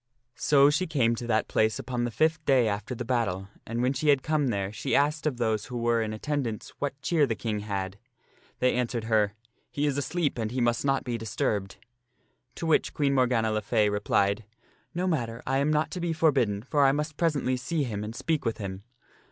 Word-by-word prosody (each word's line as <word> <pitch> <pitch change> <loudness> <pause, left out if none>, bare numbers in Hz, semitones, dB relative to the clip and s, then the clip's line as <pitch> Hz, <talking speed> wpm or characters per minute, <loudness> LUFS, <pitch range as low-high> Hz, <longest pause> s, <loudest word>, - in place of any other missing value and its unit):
So 140 +1 +4
she 170 +5 0
came 130 -7 +2
to 120 0 -5
that 110 -2 +1
place 110 0 +2
upon 120 -2 -2
the - - -1
fifth 155 +7 +1
day 130 -4 +4
after 105 +4 -3
the 120 - -5
battle, 100 -6 -1 0.2
and 115 +2 -2
when 130 +2 +2
she 150 +3 0
had 140 -2 +4
come 155 -3 +1
there 100 -3 -1
she 130 - -1
asked 150 +2 +2
of 135 -5 -1
those 110 -3 0
who 125 - -6
were 120 -1 +2
in 110 -1 -2
attendance 120 -1 -3
what 140 -1 -3
cheer 155 -5 +3
the 115 - -1
King 105 0 -2
had. 100 -2 -4 0.6
They 125 - +2
answered 120 -2 -1
her, 105 -2 +2 0.2
" - - -44
He 145 - -1
is 145 -1 +1
asleep 145 0 -1
and 110 -1 -1
he 125 +3 -3
must 120 -1 +1
not 135 -1 +1
be 120 -2 -3
dis 110 -2 -7
turbed." 100 -2 -1 0.8
To - - -10
the - - -2
which 155 - +2
Queen 140 -2 +2
Morgana 125 -4 +2
le 110 0 0
Fay 105 0 +2
replied, 105 +1 +1 0.3
" - - -37
No 180 +1 0
matter, 120 -9 -2
I 135 +1 +1
am 140 +2 +2
not 155 +1 +1
to 180 - -4
be 170 -1 0
forbidden, 130 -11 +2
for 145 +2 +2
I 135 - +6
must 150 +2 -2
presently 150 -6 +1
see 150 +5 -1
him 105 -5 -3
and 110 +2 -6
speak 155 +3 -1
with 115 - -1
him." 95 -2 -5
120 Hz, 225 wpm, -27 LUFS, 110-145 Hz, 0.8 s, I